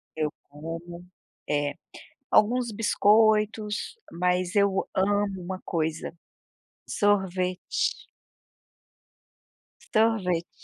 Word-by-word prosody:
eu 155 -1 -1 0.2
como. 165 +4 -8 0.4
É. 145 -1 0 0.6
Alguns 240 +2 +3
biscoitos, 215 - +2 0.2
mas 180 +2 0
eu 200 -1 +2
amo 200 0 +1
uma 185 +1 -5
coisa: 160 -1 -2 0.7
sorvete. 190 -3 0 1.8
Sorvete. 195 -6 +2
190 Hz, 70 wpm, -26 LUFS, 175-210 Hz, 1.8 s, Alguns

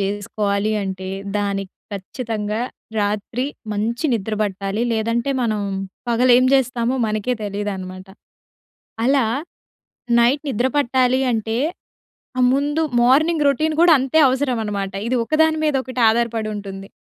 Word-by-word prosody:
చేసుకోవాలి 200 +1 -1
అంటే, 190 -1 -5 0.3
దానికి 195 -1 -2 0.2
ఖచ్చితంగా 215 +1 -4 0.4
రాత్రి 210 +4 -1 0.3
మంచి 225 +7 -2
నిద్ర 220 -1 -1
పట్టాలి. 200 +1 -2
లేదంటే, 230 +3 0
మనం 215 -3 0 0.5
పగలేం 245 +1 +5
జేస్తామో 255 -2 +2
మనకే 215 +3 -1
తెలియదనమాట. 195 -2 -5 1.0
అలా, 270 0 +3 1.0
నైట్ 255 +5 +3
నిద్ర 245 +1 +1
పట్టాలి 260 -2 +2
అంటే, 225 0 -1 0.8
ఆహ్, 250 - +5
ముందు 290 +3 0 0.2
మార్నింగ్ 300 +5 +3
రొటీన్ 310 +3 +1
గూడా 340 -2 +7
అంతే 270 +4 +1
అవసరమనమాట. 225 -7 -1 0.2
ఇది 255 - +1
ఒకదాని 315 +4 +2
మీదొకటి 260 -4 -1
ఆధారపడుంటుంది. 215 -4 -3
230 Hz, 105 wpm, -21 LUFS, 205-260 Hz, 1.0 s, గూడా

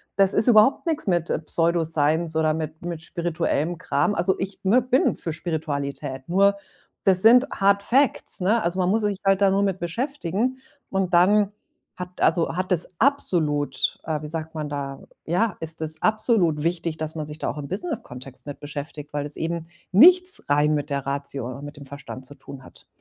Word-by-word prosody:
Das 195 -1 +3
ist 215 +3 +1
überhaupt 225 +7 +5
nix 315 -8 -2
mit 175 -3 +1 0.2
Pseudosience 160 -1 +1
oder 155 -1 +2
mit 155 0 -6
mit 170 -2 -5
spirituellem 170 0 -2
Kram. 185 +3 0
Also, 185 +2 +1
ich 190 0 -5
me 220 +7 +4
bin 255 +2 +1
für 165 - -5
Spiritualität, 140 -4 -4
nur 200 +3 +3 0.5
das 190 -2 +3
sind, 250 +4 +6
hard-facts, 200 +6 +2
ne? 215 +5 +2
Also, 175 +2 -1
man 180 -1 +1
muss 220 +3 +2
sich 205 -2 -1
halt 195 0 +3
da 195 - +5
nur 195 +1 +2
mit 195 -2 -1
beschäftigen. 235 - -2 0.3
Und 190 -2 -1
dann 200 +3 +4 0.4
hat 180 0 -8
also, 170 -1 +2
hat 185 +1 -3
es 175 -1 0
absolut 155 - +1
äh, 155 -2 -2
wie - - -5
sagt 160 +1 -5
man 150 -1 -4
da, 140 -1 -5 0.2
ja, 180 +4 0
ist 160 0 -6
es 155 0 -2
absolut 215 -8 +2
wichtig, 165 -1 -2
dass 155 0 -5
man 155 -2 -4
sich 150 0 -8
da - - -2
auch - - -6
im 140 - -6
Businesskontext 135 - -5
mit 145 -1 -7
beschäftigt, 145 0 -8
weil 145 -1 -2
es 145 - -3
eben 165 0 -4 0.2
nichts 360 - +6
rein 145 +1 +3
mit 145 0 -2
der 140 -1 -3
Ratio 140 -2 -3
und 135 +3 -8
mit 145 0 -10
dem 140 - -11
Verstand 135 -1 -9
zu 145 - -10
tun 135 -1 -12
hat. - - -17
170 Hz, 190 wpm, -23 LUFS, 150-200 Hz, 0.5 s, sind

